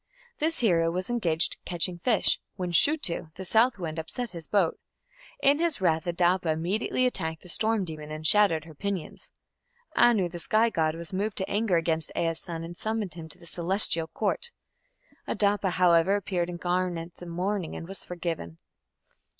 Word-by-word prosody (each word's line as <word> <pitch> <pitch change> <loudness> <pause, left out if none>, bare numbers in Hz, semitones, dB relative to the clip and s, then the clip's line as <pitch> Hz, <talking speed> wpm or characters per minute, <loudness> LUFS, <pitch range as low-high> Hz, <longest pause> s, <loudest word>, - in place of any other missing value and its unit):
This 320 +2 +2
hero 170 -7 +3
was 185 +7 -3
engaged 170 -8 +1
catching 175 0 -1
fish, 225 +2 +2 0.2
when 180 -2 -3
Shutu, 175 - +2
the 190 - -6
south 230 +5 +4
wind, 165 -3 -4
upset 235 +9 -5
his 165 -3 -8
boat. 195 -6 +1 0.6
In 280 +2 +5
his 335 -6 0
wrath 165 -2 +1
Adapa 175 0 +2
immediately 185 +10 0
attacked 160 -10 0
the 180 - -12
storm 220 +1 +1
demon 155 -2 -8
and 155 0 -7
shattered 165 -4 +4
her 160 - -12
pinions. 195 +1 -5 0.7
Anu, 230 -6 +4
the 175 0 -7
sky 220 +6 +3
god, 160 -3 0
was 170 +1 -9
moved 205 +2 -2
to 190 - -2
anger 205 -3 +1
against 165 -1 +1
Ea's 165 -1 0
son 165 -1 -5
and 170 +1 -7
summoned 215 -3 -3
him 160 -1 -9
to - - -11
the - - -15
Celestial 170 -1 +2
Court. 210 - -1 0.8
Adapa, 200 -1 +1
however, 180 +1 +4
appeared 180 -3 -1
in 175 - -5
garments 175 -1 -2
of 175 - -8
mourning 180 +1 -2
and 165 - -7
was 195 +1 -8
forgiven. 165 - -5
180 Hz, 170 wpm, -27 LUFS, 165-205 Hz, 0.8 s, In